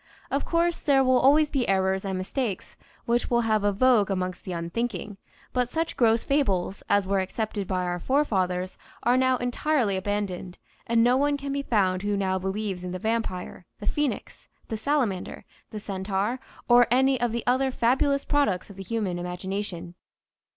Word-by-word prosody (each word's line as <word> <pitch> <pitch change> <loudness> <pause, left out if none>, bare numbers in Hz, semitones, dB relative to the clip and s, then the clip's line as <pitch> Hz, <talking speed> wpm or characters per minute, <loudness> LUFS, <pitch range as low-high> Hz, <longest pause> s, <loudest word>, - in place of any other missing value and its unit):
Of 275 - 0
course 340 0 +1
there 275 -2 +3
will 255 -1 +4
always 295 +4 +4
be 260 -6 0
errors 190 0 +1
and 190 -1 -2
mistakes 200 +2 -3 0.3
which 240 +1 0
will 235 -1 +3
have 215 -2 +1
a 205 - +3
vogue 215 -1 +3
amongst 185 -1 -2
the 185 - -5
unthinking, 205 +4 -3 0.4
but 250 -1 +1
such 325 +4 -2
gross 225 -2 +3
fables 200 -10 0
as 205 -1 +3
were 195 +1 +1
accepted 205 +1 -3
by 185 -1 -1
our 175 0 -2
forefathers 185 - 0 0.2
are 245 +1 +4
now 260 0 +3
entirely 245 -3 0
abandoned 190 -2 -3 0.3
and 230 0 +3
no 245 +2 +4
one 285 +1 +2
can 280 0 -5
be 280 - -1
found 190 -8 +1
who 205 0 -1
now 190 -1 0
believes 190 -1 -3
in 180 0 -5
the - - -2
vampire, 185 -4 -3
the 205 - -8
phoenix, 295 +4 -2 0.2
the 225 - -2
salamander, 220 -5 -1 0.2
the 215 - -6
centaur, 200 +4 -2 0.3
or 240 0 +6
any 260 +1 +3
of 240 -1 +1
the 235 0 -3
other 260 +2 +2
fabulous 270 +3 +1
products 215 -11 0
of 195 - -14
the 195 - -6
human 190 -3 -2
imagination. 180 0 -5
215 Hz, 175 wpm, -26 LUFS, 190-255 Hz, 0.4 s, or